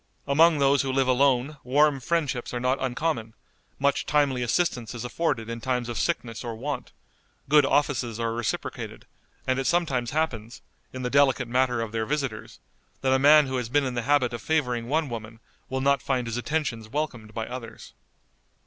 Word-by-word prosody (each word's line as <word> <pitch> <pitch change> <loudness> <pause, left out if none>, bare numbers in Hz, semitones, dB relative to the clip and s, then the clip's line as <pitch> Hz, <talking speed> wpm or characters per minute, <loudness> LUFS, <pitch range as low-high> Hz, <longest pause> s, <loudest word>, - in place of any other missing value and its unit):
Among 160 +3 +5
those 140 0 +4
who 135 - -2
live 135 0 +1
alone 135 +2 +2
warm 145 +2 +3
friendships 130 -4 -1
are - - -1
not 125 +2 0
uncommon; 125 -3 -2 0.4
much 140 +1 +1
timely 140 -4 +2
assistance 125 -3 0
is 120 0 -5
afforded 130 -3 -1
in 115 0 -5
times 125 -1 -1
of 120 - -4
sickness 115 -10 -2
or 115 -2 -4
want; 110 - -5 0.6
good 145 0 +5
offices 125 -6 0
are 115 -1 -1
reciprocated; 115 -1 -4 0.4
and 130 0 +1
it 135 - -2
sometimes 140 -9 +1
happens, 120 -8 -3 0.3
in 130 0 -6
the 125 - -2
delicate 140 -3 +3
matter 125 -1 +1
of 115 -2 -4
their 110 -1 -2
visitors, 135 -7 -3 0.4
that 130 0 +2
a 130 - +3
man 150 +2 +7
who 130 -1 -2
has 125 -2 -3
been 145 +2 +2
in 130 - -2
the 120 - -1
habit 130 -1 +2
of 120 - -5
favoring 125 -7 0
one 155 +1 +1
woman 115 -2 -7 0.3
will 130 0 -2
not 140 -1 +3
find 130 -3 -1
his 115 -1 -4
attentions 120 -4 -2
welcomed 120 -6 -4
by 110 -1 -2
others. 115 -2 -9
130 Hz, 185 wpm, -26 LUFS, 120-145 Hz, 0.6 s, man